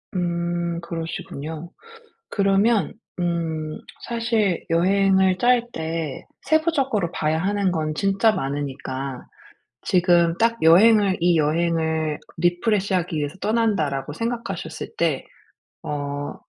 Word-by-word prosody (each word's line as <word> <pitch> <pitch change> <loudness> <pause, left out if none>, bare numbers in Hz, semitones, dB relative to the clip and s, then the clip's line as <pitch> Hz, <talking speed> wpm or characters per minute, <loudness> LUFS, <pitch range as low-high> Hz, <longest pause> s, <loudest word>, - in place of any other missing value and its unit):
음 170 -1 -1
그러시군요. 165 -1 -6 0.6
그러면 200 +2 +2 0.3
음 165 -3 -2 0.3
사실 230 -6 0
여행을 190 +2 +3
짤 245 +2 +4
때 160 -3 -4 0.2
세부적으로 275 - +1
봐야 155 +1 0
하는 195 +2 0
건 155 -2 -2
진짜 195 +5 +2
많으니까 135 -3 -4 0.6
지금 175 -2 +3
딱 230 0 +2
여행을 195 +4 +6
이 175 -1 +3
여행을' 160 0 0 0.2
리프레시 190 +4 +1
하기 175 -3 -1
위해서 150 +4 -3
떠난다.'라고 195 -12 0
생각하셨을 195 -7 -4
때 160 -6 0 0.6
어 145 0 -4
175 Hz, 235 characters per minute, -23 LUFS, 160-200 Hz, 0.6 s, 여행을